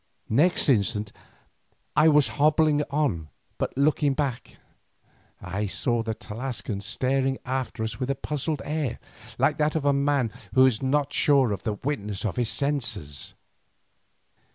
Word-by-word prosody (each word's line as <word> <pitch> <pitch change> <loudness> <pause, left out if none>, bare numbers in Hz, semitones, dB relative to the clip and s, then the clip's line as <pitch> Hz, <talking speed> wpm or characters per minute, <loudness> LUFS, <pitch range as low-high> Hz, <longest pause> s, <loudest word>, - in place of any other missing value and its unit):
Next 155 +10 +3
instant 105 -4 +1 0.8
I 155 - +5
was 150 -6 +5
hobbling 150 +3 +3
on, 125 - -1 0.3
but - - -3
looking 145 0 +2
back, 135 -4 -3 0.8
I 100 +4 -3
saw 120 +4 0
the 110 -1 -3
Tlascalan 115 -3 -5
staring 130 +5 0
after 130 -3 -3
us 110 -1 -4
with 130 - -2
a 135 - +1
puzzled 150 +2 -3
air, 150 -6 -2 0.4
like 140 +4 +2
that 150 +1 +1
of 155 -3 -1
a 140 - +4
man 140 -4 +1 0.2
who 130 0 +7
is 125 -5 +2
not 140 +2 0
sure 135 -6 +4
of 100 - -3
the 110 - -2
witness 105 -5 -3
of 105 - -2
his 120 -3 +1
senses. 115 - -2
130 Hz, 145 wpm, -26 LUFS, 110-145 Hz, 0.8 s, who